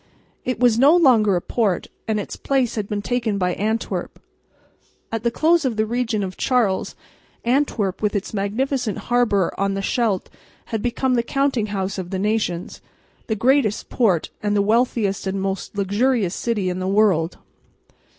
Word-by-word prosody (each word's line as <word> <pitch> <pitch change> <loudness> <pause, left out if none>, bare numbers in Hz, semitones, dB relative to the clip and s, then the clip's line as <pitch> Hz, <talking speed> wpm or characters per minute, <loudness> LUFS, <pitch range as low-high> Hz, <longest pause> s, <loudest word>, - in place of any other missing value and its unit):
It 255 -2 -2
was 240 -2 +4
no 285 +6 +6
longer 235 - +5
a 175 - 0
port, 205 -5 0 0.2
and 215 -1 0
its 205 - -5
place 265 -4 0
had 210 -3 -3
been 205 -1 -2
taken 230 -4 -1
by 180 -2 0
Antwerp. 220 +4 -2 0.9
At 225 -1 -2
the 235 - +1
close 325 +7 +2
of 255 -4 0
the 215 - +2
reign 230 -2 -1
of 185 -1 -5
Charles, 235 -8 +1 0.5
Antwerp, 235 -7 0
with 210 -1 0
its 200 +2 -3
magnificent 220 +3 -1 0.2
harbour 210 -7 +2
on 195 0 0
the 195 - -3
Scheldt, 215 -4 0 0.3
had 225 -2 -3
become 250 +2 0
the 240 - +3
"counting 265 -2 0
house" 195 -1 -3
of 180 -2 -5
the 190 - -2
nations, 200 -4 -2 0.5
the 220 - 0
greatest 245 -1 +2
port 195 -10 +1
and 210 0 0
the 200 - +3
wealthiest 220 -3 +1
and 195 +1 -2
most 195 +1 -4
luxurious 205 0 +1
city 215 -5 -1
in 180 0 -2
the 185 - -2
world. 190 -5 +2
215 Hz, 170 wpm, -22 LUFS, 195-245 Hz, 0.9 s, no